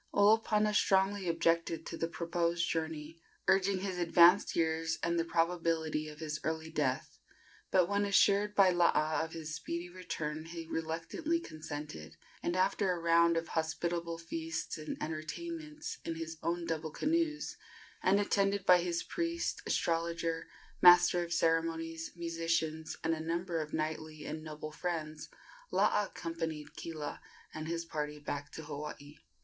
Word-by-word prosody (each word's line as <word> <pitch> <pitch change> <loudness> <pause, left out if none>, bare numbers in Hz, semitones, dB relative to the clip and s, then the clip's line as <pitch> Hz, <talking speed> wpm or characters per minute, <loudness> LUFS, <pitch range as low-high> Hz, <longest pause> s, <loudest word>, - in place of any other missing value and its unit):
Olopana 210 0 +4
strongly 195 -2 +3
objected 165 0 +1
to - - -5
the 165 - -1
proposed 170 0 0
journey, 160 0 -3 0.3
urging 190 0 +3
his 190 -2 -3
advanced 175 +2 +6
years 160 0 +1
and 170 0 +1
the - - +2
probability 165 -2 0
of 150 - -10
his 155 -1 -3
early 160 0 -2
death; 150 0 -1 0.5
but 180 -2 +4
when 200 +1 +1
assured 205 +1 +4
by 190 -2 +6
Laa 160 -3 +3
of 160 - -6
his 160 -2 -5
speedy 170 +3 -4
return 155 -4 -4
he 165 0 -7
reluctantly 165 - -2
consented, 150 - -7 0.2
and 175 - -1
after 190 +1 +2
a 180 - -1
round 170 0 +4
of 165 0 -2
hospitable 170 +1 -1
feasts 165 -1 -4
and 155 0 -5
entertainments, 300 - -5
in 165 - -3
his 160 0 -6
own 170 0 -1
double 160 -1 -2
canoes, 310 - 0 0.4
and 195 +2 +4
attended 200 -1 +1
by 180 -1 +7
his 170 -1 -1
priest, 335 0 -2
astrologer, 165 0 0 0.3
master 175 0 +8
of 170 -1 -4
ceremonies, 165 -1 0
musicians, 165 -2 -1
and 165 - +2
a 160 - -3
number 170 +1 -2
of 155 0 -6
knightly 155 -1 -3
and 155 0 -5
noble 155 -1 -6
friends, 155 -2 -4 0.4
Laa 210 - +3
accompanied 165 -4 -5
Kila 155 -3 -5 0.3
and 155 0 -5
his 170 0 -2
party 150 -2 -3
back 145 0 -5
to 160 - -7
Hawaii. 150 0 -7
165 Hz, 145 wpm, -33 LUFS, 160-180 Hz, 0.5 s, master